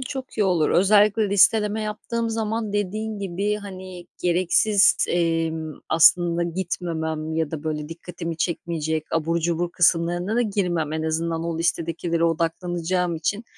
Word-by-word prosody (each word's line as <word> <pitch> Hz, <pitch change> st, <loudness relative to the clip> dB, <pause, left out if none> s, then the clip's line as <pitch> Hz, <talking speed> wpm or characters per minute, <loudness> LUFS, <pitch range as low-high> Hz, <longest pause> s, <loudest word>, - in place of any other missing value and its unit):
çok 260 Hz, -1 st, -7 dB
iyi 210 Hz, -, +3 dB
olur. 175 Hz, -5 st, +2 dB
Özellikle 205 Hz, +2 st, +4 dB
listeleme 210 Hz, +2 st, +3 dB
yaptığım 230 Hz, +2 st, -3 dB
zaman 220 Hz, -1 st, -2 dB
dediğin 210 Hz, +2 st, -2 dB
gibi, 200 Hz, +2 st, -2 dB
hani, 185 Hz, -3 st, -9 dB, 0.2 s
gereksiz, 185 Hz, +4 st, +3 dB
emm, 165 Hz, -2 st, 0 dB, 0.2 s
aslında 170 Hz, +1 st, +4 dB
gitmemem 160 Hz, -3 st, -3 dB
ya 160 Hz, -2 st, -1 dB
da, 160 Hz, -1 st, -6 dB
böyle, 150 Hz, -1 st, -3 dB
dikkatimi 165 Hz, 0 st, -6 dB
çekmeyecek, 160 Hz, -2 st, -2 dB
abur 165 Hz, +1 st, 0 dB
cubur 170 Hz, +1 st, -1 dB
kısımlarına 175 Hz, +4 st, +1 dB
da 245 Hz, -, +3 dB
girmem. 180 Hz, -8 st, -1 dB
En 160 Hz, 0 st, -2 dB
azından 165 Hz, +1 st, -2 dB
o 165 Hz, -1 st, -3 dB
listedekilere 170 Hz, 0 st, -1 dB
odaklanacağım 170 Hz, +1 st, -1 dB
için, 200 Hz, +8 st, -2 dB
175 Hz, 135 wpm, -23 LUFS, 165-200 Hz, 0.2 s, Özellikle